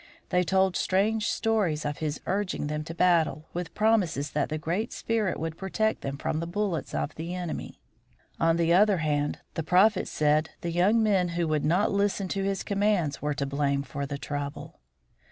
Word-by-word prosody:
They 180 - +3
told 190 +1 +2
strange 210 +3 +1
stories 200 -10 0
of 145 0 -3
his 155 -1 -2
urging 190 -4 -1
them 150 +1 -3
to 165 - -7
battle 165 -4 +2
with 175 -1 -5
promises 195 -10 +1
that 145 -1 0
the 155 - -2
Great 175 +9 -2
Spirit 220 -5 -1
would 160 +1 -4
protect 220 +3 0
them 135 0 -4
from 155 - -2
the 165 - -3
bullets 180 - -2
of 75 0 -2
the 170 +3 -5
enemy. 175 -3 -5 0.6
On 165 0 +3
the 170 0 +3
other 200 +1 +5
hand, 150 -2 -1
the - - -2
Prophet 185 +5 +3
said 155 +1 +2
the 170 - -2
young 200 +7 +3
men 195 -4 +3
who 170 -1 +1
would 155 -1 0
not 180 +7 +2
listen 200 -1 0
to 195 - -1
his 195 -1 -1
commands 200 -7 0
were 150 0 -1
to 140 - -1
blame 140 0 0
for 140 +1 -5
the 140 0 -4
trouble. 145 0 -5
170 Hz, 190 wpm, -27 LUFS, 150-195 Hz, 0.6 s, other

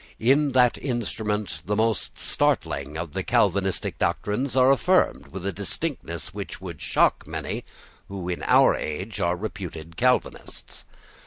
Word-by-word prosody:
In 140 +4 +3
that 125 -2 +4
instrument 110 -5 -2
the 105 - +1
most 110 -1 0
startling 70 +3 0
of 85 -2 -5
the - - -1
Calvinistic 95 -1 +1
doctrines 125 +6 -1
are 130 0 +6
affirmed 105 - +2
with 90 +5 -7
a 100 - 0
distinctness 100 - -3
which 100 -1 -6
would 85 -5 -8
shock - - +2
many - - -4 0.4
who, 95 -3 -6
in 90 -1 -3
our - - +6
age, 95 +6 -4
are 85 +1 +1
reputed 85 -6 -7
Calvinists. 125 0 -1
100 Hz, 140 wpm, -25 LUFS, 85-120 Hz, 0.4 s, are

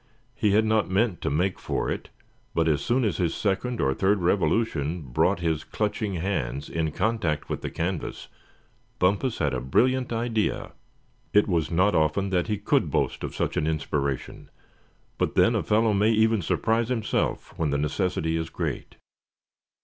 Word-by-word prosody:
He 105 -2 +1
had 110 +2 +4
not 110 -2 +2
meant 100 0 +1
to - - -1
make 90 +6 0
for - - -2
it, - - -5 0.5
but 80 0 +2
as 75 -3 +2
soon 125 +1 +1
as 105 - 0
his 85 -3 0
second 110 +4 -1
or 65 -1 +2
third 100 +8 +2
revolution 85 -3 0
brought 65 +6 +1
his 80 -2 0
clutching 105 -1 -2
hands 75 -6 -2
in 80 -2 -1
contact 100 -7 -1
with - - -3
the - - -3
canvas, 85 0 -4 0.7
Bumpus 100 +7 +1
had 75 -4 0
a 65 - -1
brilliant 125 - +2
idea. 115 -2 -1 0.6
It 105 - +5
was 85 -5 0
not 90 +5 +3
often 80 +5 +1
that 90 -2 +1
he 105 - -1
could 100 - +1
boast - - -1
of - - -5
such - - -1
an 75 - +1
inspiration; 70 -3 -2 0.7
but - - 0
then - - +5
a - - +1
fellow 110 0 +2
may 105 +2 +3
even 110 -1 +3
surprise 115 +7 0
himself 115 -4 -1
when 80 -2 +1
the 70 - +1
necessity 80 +2 -1
is 80 0 -3
great. - - -4
95 Hz, 170 wpm, -26 LUFS, 80-110 Hz, 0.7 s, It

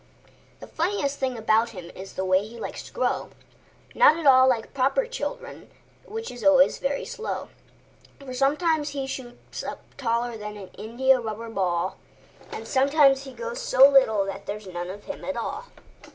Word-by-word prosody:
The - - -7
funniest 320 -5 -1
thing 260 -2 -1
about 220 +1 +2
him 175 -1 -8
is 190 +1 -10
the 190 - -3
way 185 +1 +3
he 230 +2 -10
likes - - -5
to - - -14
grow—Not - - 0
at 330 - -5
all 260 -1 +7
like 240 -4 0
proper 275 - +2
children, - - -6 0.4
which 450 +2 -6
is 245 - -9
always 280 -1 +5
very 275 +1 -2
slow; 450 - -5 0.7
For 280 - -14
he 255 - -7
sometimes 295 +3 +1
shoots 270 -3 -6
up - - -6 0.2
taller 240 -2 0
like - - -12
an 195 -3 -10
India 255 +4 +1
rubber 225 0 -5
ball, 180 -5 -1 0.5
And - - -5
he - - -11
sometimes 275 +1 +3
gets 475 - -6
so 275 - +7
little 260 -8 +4
that 195 0 -7
there's 210 0 -5
none 175 -1 -5
of 205 +2 -8
him 290 - -7
at 280 -3 -3
all. 420 - -4
260 Hz, 170 wpm, -25 LUFS, 220-290 Hz, 0.7 s, all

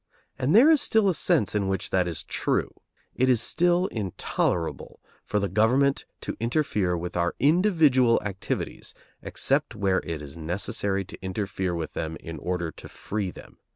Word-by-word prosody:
And 135 +6 +2
there 270 +8 +8
is 305 -3 +5
still 220 -7 +3
a - - +2
sense 160 - +1
in 100 -2 0
which 95 -1 -2
that 90 -1 +2
is 85 - -4
true. - - -1 0.4
It 130 +1 +2
is 125 -3 +4
still 175 +8 +2
intolerable 95 - -2 0.2
for 105 - -2
the 100 -1 +1
government 125 +8 +2 0.2
to - - -4
interfere 115 - 0
with 90 +1 -5
our 85 0 0
individual 150 - +4
activities 95 -2 -4 0.3
except - - 0
where 100 -2 +1
it 80 -3 -4
is 75 0 -9
necessary 95 +4 -2
to - - -12
interfere 95 -1 -2
with 80 -2 -4
them 80 +1 -4
in 80 0 -8
order 90 -1 -2
to - - -12
free 100 -2 -4
them. - - -13
100 Hz, 165 wpm, -26 LUFS, 90-140 Hz, 0.4 s, there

